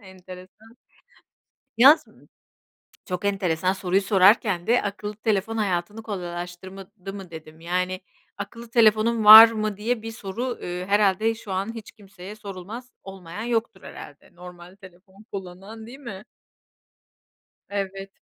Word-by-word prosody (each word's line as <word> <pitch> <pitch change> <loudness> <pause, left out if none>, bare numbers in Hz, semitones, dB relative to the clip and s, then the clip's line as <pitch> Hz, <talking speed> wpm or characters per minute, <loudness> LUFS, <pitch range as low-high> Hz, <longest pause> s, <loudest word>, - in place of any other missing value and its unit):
enteresan. 190 +3 -14 1.0
Yaz 275 +7 +7 1.0
Çok 180 +1 -5
enteresan 185 -3 0
soruyu 190 0 0
sorarken 195 -2 +3
de 240 +2 +3
akıllı 205 +1 -5
telefon 220 0 -1
hayatını 205 +1 -2
kolaylaştırmadı 185 +1 -8
mı 195 -3 -10
dedim. 160 0 -12
Yani, 180 +2 -2 0.4
akıllı 230 +4 -9
telefonun 225 -1 +3
var 220 +2 +12
mı 215 -2 -3
diye 225 +2 -2
bir 225 +1 -7
soru, 225 +4 -5
eee, 180 +1 -5
herhâlde 205 +2 +2
şu 220 -3 -10
an 195 +4 -3
hiç 225 -3 -10
kimseye 200 -2 -12
sorulmaz. 210 +4 -9
Olmayan 190 +1 -9
yoktur 230 -4 -2
herhâlde. 145 +3 -13
Normal 180 0 -13
telefon 190 +2 -18
kullanan 195 +4 -9
değil 260 +4 -12
mi? 210 -8 -9 1.5
Evet. 195 -1 -5
195 Hz, 120 wpm, -24 LUFS, 185-220 Hz, 1.5 s, var